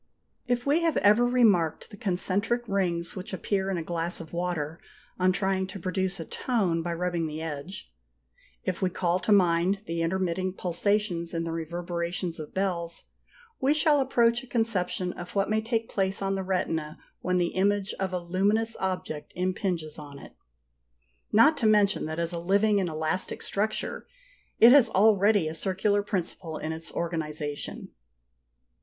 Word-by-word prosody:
If 245 0 0
we 295 +4 +3
have 330 -2 +1
ever 210 +4 +5
remarked 215 -9 +2
the - - -9
concentric 205 +5 -1
rings 175 -4 -1
which 190 0 -6
appear 190 +1 -1
in 190 - -1
a 165 - -3
glass 170 +1 -2
of 165 -1 -10
water 170 -3 -2 0.4
on 185 0 +4
trying 190 -1 0
to 195 +1 -8
produce 185 +1 -2
a 165 - -5
tone 190 -9 0
by 170 +1 -3
rubbing 175 -1 -1
the 155 0 -5
edge; 160 - -6 0.7
if 185 -2 -3
we 185 - +2
call 180 0 0
to 185 +4 -1
mind 185 0 +3
the 165 0 -2
intermitting 185 +1 -1
pulsations 180 -1 -1
in 165 - -1
the 165 - -3
reverberations 170 +1 -3
of 155 - -7
bells, 175 -3 -2 0.6
we 280 +2 +3
shall 305 -1 +4
approach 240 -3 +3
a 260 - -13
conception 190 -6 -1
of 175 +3 -9
what 200 +1 +1
may 220 0 +2
take 225 0 -1
place 195 -1 0
on 195 0 -1
the 195 - -1
retina 165 -5 -2 0.2
when 180 0 0
the 175 -1 0
image 200 +1 +1
of 190 -1 -1
a 180 - -1
luminous 200 +6 0
object 185 -5 -3
impinges 180 -4 -2
on 145 -2 -10
it, - - -12 1.0
not 230 +9 +6
to 225 - +2
mention 210 -1 +3
that 155 0 -4
as 170 +1 -1
a 170 - -2
living 200 +4 +3
and 185 -3 0
elastic 160 +3 -1
structure, 215 +2 -2 0.5
it 230 +2 +9
has 260 -4 +7
already 205 -3 +4
a 155 - -3
circular 195 +4 0
principle 175 -4 -4
in 155 - -4
its 160 +1 -6
organisation. 155 -3 -4
185 Hz, 165 wpm, -27 LUFS, 170-205 Hz, 1.0 s, it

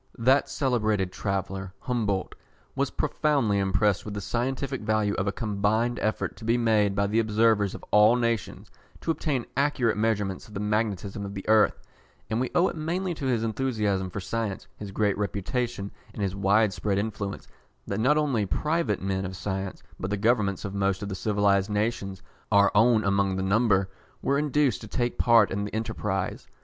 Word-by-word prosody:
That 130 +4 +3
celebrated 110 -8 0
traveller, 95 -1 -3
Humboldt, 105 -7 -1 0.4
was - - 0
profoundly 135 -10 +1
impressed 100 0 +1
with 105 -1 -6
the - - -2
scientific 130 +4 -2
value 105 -1 +1
of 95 - -1
a - - +2
combined 110 +2 0
effort 110 0 -1
to - - -12
be 115 +2 +2
made 110 -4 +2
by 100 0 +2
the 105 +3 +1
observers 110 -2 +2
of - - -10
all 105 +3 +6
nations, 115 -3 -2 0.3
to 165 - 0
obtain 145 -6 -1
accurate 140 -5 +1
measurements 105 -3 -1
of 105 - -13
the - - -2
magnetism 105 -2 -1
of 100 0 -6
the 95 - -7
earth; 110 -1 +4 0.5
and 110 - +1
we 130 - -1
owe 180 +1 +5
it - - -4
mainly 175 +4 -2
to 140 -4 -4
his 120 -3 +1
enthusiasm 105 -5 -1
for 105 - -5
science, 110 0 -3
his 105 - -7
great 100 0 +1
reputation 105 +1 -2 0.2
and 105 - -3
his 95 -1 -1
wide 100 +1 +3
spread 100 0 -1
influence, 100 -1 -3 0.4
that - - -3
not 135 +7 +3
only 140 -8 +1
private 150 - 0
men 95 0 -1
of 95 0 -5
science, 95 0 -4 0.2
but 95 - -3
the 105 - -1
governments 105 -3 +1
of 100 - -4
most 100 0 0
of 100 - -4
the - - -3
civilised 100 0 +1
nations, 105 -2 -2 0.3
our 100 -1 +5
own 110 +1 +4
among 100 -1 +1
the 95 - -2
number, 100 -1 +3 0.4
were 140 +1 +2
induced 145 -7 +1
to - - -8
take 120 -1 -2
part 115 -4 +5
in 100 +2 -1
the 105 - -5
enterprise. 105 -3 -3
105 Hz, 180 wpm, -27 LUFS, 100-120 Hz, 0.5 s, all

